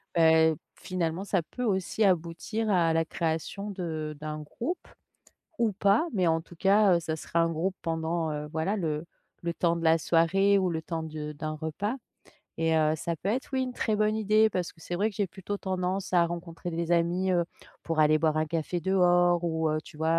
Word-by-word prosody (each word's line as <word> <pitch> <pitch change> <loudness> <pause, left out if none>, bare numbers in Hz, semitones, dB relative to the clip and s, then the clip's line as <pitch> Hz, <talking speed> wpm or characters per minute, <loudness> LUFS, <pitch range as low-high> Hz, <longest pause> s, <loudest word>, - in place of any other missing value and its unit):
Beh, 160 -1 +5 0.2
finalement, 180 0 -3
ça 190 -3 +1
peut 250 - -6
aussi 205 0 +1
aboutir 185 +5 0
à 170 -4 +3
la 165 0 +2
création 165 +5 -3
de 160 -5 -4
d'un 155 0 -4
groupe 260 - -5 0.7
ou 225 -4 +2
pas. 200 - +3
Mais, 185 -5 +2
en 165 0 +3
tout 165 +1 -14
cas, 195 +1 +4
heu, - - +2
ça 160 -1 -3
sera 170 - -2
un 165 - +2
groupe 175 +4 -1
pendant, 165 0 -1
heu, 150 0 -4
voilà, 160 +7 -1
le 155 -3 -2 0.4
le 170 0 -1
temps 170 -1 +2
de 170 - -4
la 165 0 +5
soirée 185 +6 +3
ou 185 -1 +1
le 160 -1 -2
temps 165 -2 -3
de 155 -1 -5
d'un 155 +1 -4
repas 165 - -3 0.6
et 165 0 +2
heu, 155 0 +3
ça 170 +2 -2
peut 190 - -4
être, 255 +4 -2
oui, 260 -1 +1
une 255 -1 -3
très 215 - 0
bonne 215 +1 +2
idée 215 +1 +4
parce 180 -3 -2
que 165 - -23
c'est 175 - -5
vrai 210 +4 +2
que - - -14
j'ai 205 - +1
plutôt 190 +3 -5
tendance 185 0 -2
à 175 -1 +5
rencontrer 170 0 -6
des 170 +1 -1
amis, 175 +3 +2
heu, 175 -1 +2 0.4
pour 165 -2 0
aller 155 0 +5
boire 155 -1 +1
un 155 - +2
café 165 +2 -2
dehors 175 -1 +3
ou, 160 -1 0
heu, 155 - 0
tu 150 - -14
vois, 165 +1 +2
170 Hz, 210 wpm, -28 LUFS, 160-195 Hz, 0.7 s, Beh